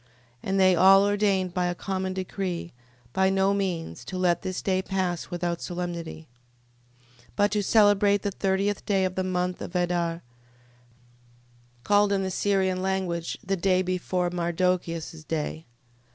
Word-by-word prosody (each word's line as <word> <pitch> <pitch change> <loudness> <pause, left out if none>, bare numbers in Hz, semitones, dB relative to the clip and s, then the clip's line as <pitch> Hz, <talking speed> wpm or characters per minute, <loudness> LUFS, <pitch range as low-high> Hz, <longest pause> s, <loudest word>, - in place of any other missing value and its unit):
15:36. 120 - -32 0.4
And 195 0 +1
they 185 -1 +5
all 195 +3 +7
ordained 200 -3 +1
by 180 -1 0
a 175 - -2
common 190 0 -3
decree, 185 -2 -4 0.4
by 190 0 +3
no 195 +1 +2
means 185 -5 -3
to 185 - -5
let 175 -2 +2
this 185 -1 -3
day 185 -1 +1
pass 185 -3 -2
without 175 -1 -3
solemnity: 170 -2 -5 0.9
15:37. 120 - -25
But 205 0 +2
to 210 -1 +1
celebrate 205 -1 +4
the 205 - -1
thirteenth 195 +1 -1
day 195 -2 +2
of 185 - -2
the 185 - -1
month 180 0 -2
of 180 - -7
Adar, 175 -1 0 1.6
called 205 +3 +3
in 195 -1 +1
the 190 - -2
Syrian 190 -1 +1
language, 185 -3 -2
the 195 +1 0
day 185 0 +2
before 180 -1 -1
Mardochias' 170 -2 -1
day. 160 +1 -4
185 Hz, 150 wpm, -26 LUFS, 175-195 Hz, 1.6 s, all